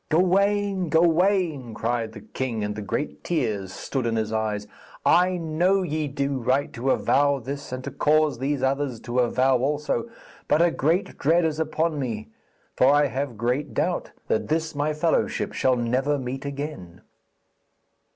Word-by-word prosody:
'Gawaine, 195 +2 +2
Gawaine,' 165 - +2
cried 115 0 -2
the 105 - -10
king, 120 -3 -3
and 105 0 -2
the 105 - -5
great 125 +8 -3
tears 110 - -1
stood 120 +5 -3
in 115 - 0
his 110 0 -1
eyes, 105 -2 -1 0.4
'I 180 +1 +4
know 175 +4 +1
ye 155 -2 -2
do 140 -1 -2
right 135 +5 0
to 125 +3 -2
avow 140 +1 +3
this 140 +2 -6
and 130 0 -5
to 140 - -5
cause 150 -1 +2
these 135 0 -1
others 135 -2 0
to 125 +1 -2
avow 130 +1 +3
also; 150 - -1 0.4
but - - +3
a 170 0 +4
great 165 +7 0
dread 165 +4 +3
is 155 -1 -1
upon 160 0 0
me, 115 -5 -4 0.5
for 130 +2 +5
I 145 0 +4
have 130 -3 -3
great 125 +6 -1
doubt - - 0 0.2
that - - 0
this 160 +1 -1
my 145 +1 0
fellowship 155 +2 0
shall 130 -1 +2
never 130 +5 0
meet 130 +1 -5
again.' 140 - -6
140 Hz, 160 wpm, -25 LUFS, 125-160 Hz, 0.5 s, for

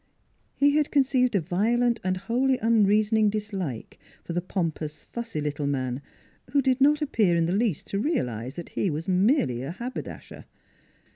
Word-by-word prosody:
He 285 +1 +3
had 300 -1 +1
conceived 260 -4 +2
a - - +4
violent 230 +8 +1
and 185 0 0
wholly 250 +7 +1
unrea 215 -2 +3
soning 215 -1 +3
dislike 195 - -4 0.2
for 170 - -5
the 175 - 0
pompous, 160 -5 -3
fussy 230 -10 -5
little 145 -1 -2
man, 130 -2 -2 0.5
who 285 - +4
did 260 0 +1
not 300 +2 +4
appear 215 -11 +2
in 165 -1 +2
the 170 - 0
least 205 -6 0
to 195 - -1
realize 130 - -2
that 170 - -7
he 195 - -1
was 155 +1 -4
merely 185 - +2
a 135 - -5
haberdasher. 240 +8 -7
200 Hz, 165 wpm, -26 LUFS, 160-240 Hz, 0.5 s, a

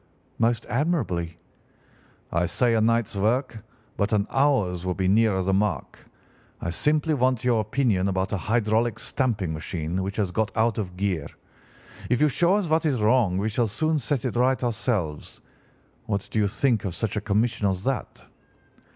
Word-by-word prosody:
"'Most 115 0 +1
admirably.' 120 - -1 0.9
"'I 85 +1 +1
say 120 +6 +1
a 110 - +2
night's 115 -1 +1
work, 115 +2 0 0.3
but 100 0 0
an 100 -1 +2
hour's 125 -11 +1
would 90 -1 -2
be 95 -1 0
nearer 100 -1 +3
the 95 +1 0
mark. 95 -8 -1 0.6
I 85 - -3
simply 150 - +1
want 130 -3 +1
your 120 -3 +2
opinion 110 -4 +1
about 95 0 -1
a - - +1
hydraulic 110 +3 +1
stamping 105 - -1
machine 80 +2 -3
which 100 +1 -4
has 100 -4 0
got 110 +3 0
out 115 0 +2
of 90 -3 -5
gear. 90 -6 -1 0.8
If 125 0 +2
you 150 - +4
show 175 +7 +3
us 205 -4 0
what 160 +1 +2
is 135 -5 0
wrong 110 -4 +3
we 100 +3 0
shall 115 +2 +1
soon 155 +9 0
set 140 -2 -2
it 125 - -2
right 130 +1 +2
ourselves. 105 - -2 0.7
What 100 -3 -2
do 110 - 0
you 105 - +3
think 115 +1 +1
of 95 -4 -3
such 110 -3 -2
a 105 - -1
commission 105 +1 0
as 95 0 -3
that? 135 +1 -3
110 Hz, 175 wpm, -25 LUFS, 95-125 Hz, 0.9 s, you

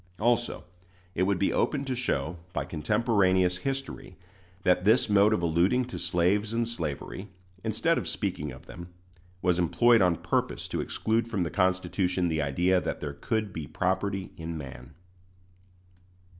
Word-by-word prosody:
Also 120 +2 +1 0.5
it 90 - -2
would 100 -2 +2
be 100 - +1
open 140 -2 0
to 130 - -2
show, 90 - -1 0.2
by - - -2
contemporaneous 95 - +2
history, 135 -5 -5 0.5
that 90 0 +3
this 110 +6 +4
mode 105 0 +5
of 105 -5 +1
alluding 90 +10 +2
to 125 - -7
slaves 100 +5 +1
and 115 0 0
slavery, 95 -1 -5 0.4
instead - - +1
of - - -5
speaking 75 0 -3
of 65 - -12
them, 85 0 -9 0.6
was 90 -1 +2
employed 115 +6 +4
on 90 -2 +4
purpose - - -1
to - - -2
exclude 115 +1 -1
from 105 -6 -1
the 85 - -3
Constitution 95 -1 +1
the 80 -1 0
idea 90 +6 +2
that - - -3
there 70 -1 -4
could 110 +6 -2
be 80 -4 -5
property 95 +3 -1
in 80 0 -5
man. 70 -4 -9
95 Hz, 155 wpm, -28 LUFS, 85-110 Hz, 0.6 s, mode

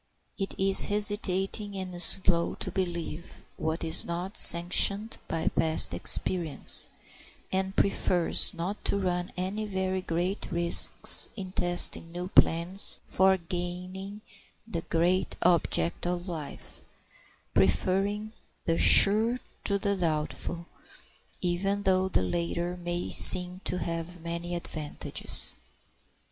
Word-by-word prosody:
It 195 -1 -6
is 195 0 +4
hesitating 205 -1 0
and 180 -2 -7
slow 170 -1 +1
to - - -7
believe 175 -3 -7
what 160 +1 -5
is 160 - -1
not 175 +3 -7
sanctioned 195 +5 +6
by 165 -1 -3
past 160 -1 +2
experience, 170 -5 +3 0.6
and 190 +1 -3
prefers 180 -3 0
not 180 +5 -7
to - - -1
run 180 -2 -4
any 195 +4 -5
very 190 -2 -4
great 180 +3 -5
risks 170 0 +3
in 190 -3 -9
testing 175 -2 0
new 180 +1 -8
plans 175 +2 0
for 190 0 +1
gaining 180 +3 -8 0.5
the 170 -7 -6
great 175 +3 -2
object 170 - 0
of 175 +1 -5
life, 160 -5 -10 0.7
preferring 195 - -1 0.3
the 165 - -2
sure 220 +4 +5 0.3
to 200 - 0
the 200 0 -3
doubtful, 170 0 -4 0.8
even 195 +3 -3
though 190 -1 0
the 95 - -1
latter 170 - -4
may 175 0 -6
seem 180 +1 +8
to 180 - -1
have 170 +1 -6
many 170 +1 -7
advantages. 155 -3 -5
180 Hz, 115 wpm, -26 LUFS, 170-195 Hz, 0.8 s, seem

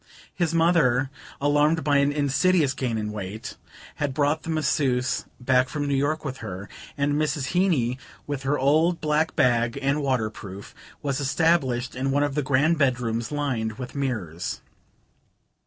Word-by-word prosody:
His 175 -4 0
mother, 165 -6 +3 0.3
alarmed 150 +3 +2
by 145 -1 +3
an 140 +1 +3
insidious 150 +1 +2
gain 125 -4 -2
in 105 -1 -3
weight, 105 +1 -6 0.4
had 145 -3 -2
brought 150 +1 +1
the - - -8
masseuse 135 -5 0
back 130 +1 +2
from 145 -1 -2
New 140 - 0
York 145 +3 0
with 135 -2 -4
her, 100 -3 -7 0.3
and 145 +1 +1
Mrs. 145 -2 0
Heeny, 145 -10 +2 0.3
with 145 -2 -4
her 135 +2 0
old 155 +6 +3
black 155 +1 0
bag 120 -3 +2
and 140 +2 0
waterproof, 110 -7 -3 0.3
was 140 -1 -1
established 135 -4 +1
in 130 +1 -1
one 140 +2 +2
of 145 -1 -1
the 150 - 0
grand 145 +4 +2
bedrooms 120 -4 0
lined 130 -7 -1
with 125 +3 -8
mirrors. 105 - -3
140 Hz, 155 wpm, -25 LUFS, 125-150 Hz, 0.4 s, mother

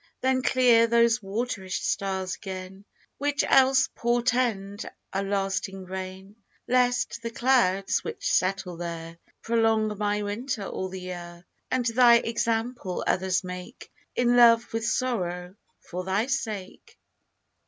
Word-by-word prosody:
Then 260 0 +2
clear 245 -3 +4
those 235 0 +3
waterish 195 -2 -3
stars 190 -2 -1
again, 190 0 -8 0.3
Which 285 0 +1
else 265 0 +5
portend 235 -4 0 0.2
a 195 - 0
lasting 195 -1 -2
rain; 190 +2 -7 0.3
Lest 245 -1 +1
the 230 - -4
clouds 230 -6 +2
which - - -5
settle 185 -1 0
there 170 -1 -6 0.2
Prolong 225 -2 +2
my 210 0 0
winter 210 +2 -3
all 190 0 -4
the 185 0 -7
year, 175 -1 -8 0.2
And 255 -2 0
thy 235 +1 +6
example 230 -3 -1
others 185 +1 +1
make 180 +5 -9 0.2
In 245 0 +3
love 235 -1 +5
with 225 0 -1
sorrow, 180 -9 -2 0.3
for 180 +1 -6
thy 190 +4 0
sake. 220 -8 -5
210 Hz, 120 wpm, -26 LUFS, 190-240 Hz, 0.3 s, thy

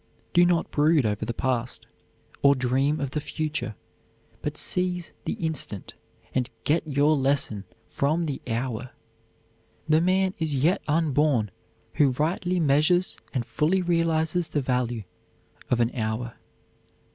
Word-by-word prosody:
Do 175 0 +6
not 175 -2 +1
brood 150 -2 +3
over 105 -1 -1
the - - -2
past, 125 -2 -2 0.6
or 140 0 +6
dream 135 +4 +1
of 140 -2 -2
the 150 - -2
future, 150 -8 -3 0.7
but - - -3
seize 180 -1 -2
the - - -1
instant 155 - -4 0.4
and 130 -1 0
get 160 +2 +1
your 145 +1 +3
lesson 135 -7 0 0.2
from 155 +5 0
the 145 -4 -3
hour. 125 +1 -3 0.9
The 155 +1 +4
man 185 +1 +2
is 155 -3 +1
yet 155 +8 +2
unborn 150 - +2 0.4
who 140 -3 +3
rightly 175 +6 0
measures 160 +4 +3 0.2
and 125 -3 -2
fully 180 +9 +1
realizes 165 0 +1
the 155 -2 -1
value 125 -3 -1 0.7
of 125 - +2
an 120 0 +2
hour. 115 +1 -2
145 Hz, 135 wpm, -26 LUFS, 125-165 Hz, 0.9 s, Do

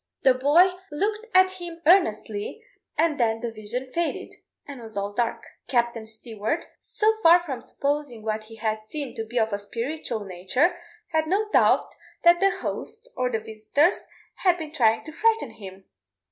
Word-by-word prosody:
The 260 - +6
boy 295 +9 +5 0.2
looked 425 +8 -2
at 375 0 +4
him 340 -1 -7
earnestly, 220 - +2 0.3
and 315 -2 +2
then 225 -2 +2
the 235 0 -4
vision 230 +4 -6
faded, 340 +2 -2 0.3
and 280 -3 -8
all - - -9 0.2
was 205 - -16
dark. 235 0 -1 0.2
Captain 235 -3 0
Stewart, 220 +6 -3
so 435 +1 +1
far 340 -1 +8
from 290 -8 -5
supposing 280 -5 -3
what 215 0 -2
he 225 +1 -12
had 220 0 -2
seen 275 +5 -6
to 225 - -4
be 230 +3 -6
of 220 -2 +2
a 200 - -1
spiritual 230 +1 -4
nature, 195 - +1 0.3
had 315 -1 0
no 405 +5 +1
doubt - - +3 0.3
that 345 0 +6
the 390 - +5
host, 455 +5 -5
or 250 - 0
the 230 - 0
visitors, 220 - 0 0.3
had 360 -2 +3
been 315 -3 -6
trying 225 -7 +2
to 310 - -9
frighten 445 - +1
him. 195 -3 -11
255 Hz, 170 wpm, -25 LUFS, 220-340 Hz, 0.3 s, far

